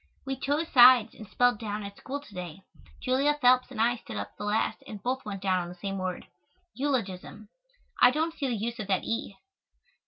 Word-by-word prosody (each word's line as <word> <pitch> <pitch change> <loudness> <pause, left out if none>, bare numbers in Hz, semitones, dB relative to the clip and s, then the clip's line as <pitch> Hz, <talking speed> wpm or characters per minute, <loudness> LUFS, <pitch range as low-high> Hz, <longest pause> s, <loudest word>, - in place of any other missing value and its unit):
We 270 0 -2
chose 290 +5 -1
sides 245 -3 +7
and 215 - -11
spelled 245 -1 +2
down 210 -1 -4
at 200 0 -8
school 275 +6 -6
to 215 - -16
day. 180 0 -7 0.4
Julia 275 +3 +2
Phelps 250 -1 +4
and 250 -5 -8
I 240 +2 +2
stood 165 - -8
up 100 0 -6
the - - -6
last 210 +1 0
and 210 - -7
both 260 +2 -2
went 200 -2 -6
down 185 -2 +2
on 175 - -6
the 180 - -9
same 195 +2 -4
word 185 -1 -4 0.5
eulogism. 215 -7 -3 0.5
I 245 - +9
don't 320 +5 -1
see 290 -4 -3
the 245 - -1
use 230 +3 -4
of 210 - -4
that 190 -2 +1
"e." 225 -3 -3
225 Hz, 210 wpm, -28 LUFS, 195-260 Hz, 0.5 s, I